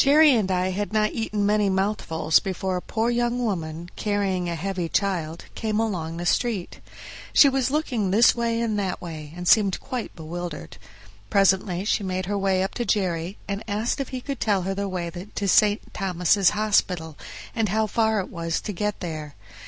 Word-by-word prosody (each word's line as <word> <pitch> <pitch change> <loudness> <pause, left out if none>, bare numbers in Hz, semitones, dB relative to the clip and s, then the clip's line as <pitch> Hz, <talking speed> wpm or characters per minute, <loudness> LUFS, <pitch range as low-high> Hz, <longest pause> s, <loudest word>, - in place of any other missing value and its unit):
Jerry 295 +1 +6
and 215 -6 +1
I 185 0 +1
had 205 +3 -3
not 215 0 +1
eaten 215 -3 -1
many 210 -1 +3
mouthfuls 190 -5 +1
before 190 0 -3
a 180 - -2
poor 230 +4 -1
young 240 0 0
woman, 170 -8 -3
carrying 195 -4 -1
a 170 - -2
heavy 180 0 -3
child, 170 -5 -1
came 215 -1 -1
along 170 -7 -2
the 175 - -4
street. 210 -2 0 0.5
She 285 - +8
was 270 -2 +1
looking 260 -9 0
this 215 +5 +6
way 230 -1 -1
and 220 -3 0
that 190 -3 -2
way, 155 -4 -8
and 180 0 -5
seemed 200 -2 +4
quite 250 -3 -5
bewildered. 175 +2 -6 0.5
Presently 190 -2 +2
she 215 - +1
made 185 -1 -2
her 205 +2 -2
way 190 -1 +2
up 190 - -3
to - - +2
Jerry 185 -3 -1
and 200 +1 -3
asked 215 +5 -1
if 270 - -4
he 255 -1 -5
could 275 +1 -5
tell 200 -4 +1
her 195 +2 -1
the 200 0 -3
way 175 -2 -3
to 195 +3 -5
St. 205 +2 +3
Thomas' 185 0 +2
Hospital, 185 -7 0 0.4
and 225 -3 0
how 220 +3 +2
far 220 0 +1
it 190 - -4
was 165 -1 -2
to 210 - -4
get 210 +2 -2
there. 155 -4 -5
195 Hz, 190 wpm, -24 LUFS, 180-215 Hz, 0.5 s, She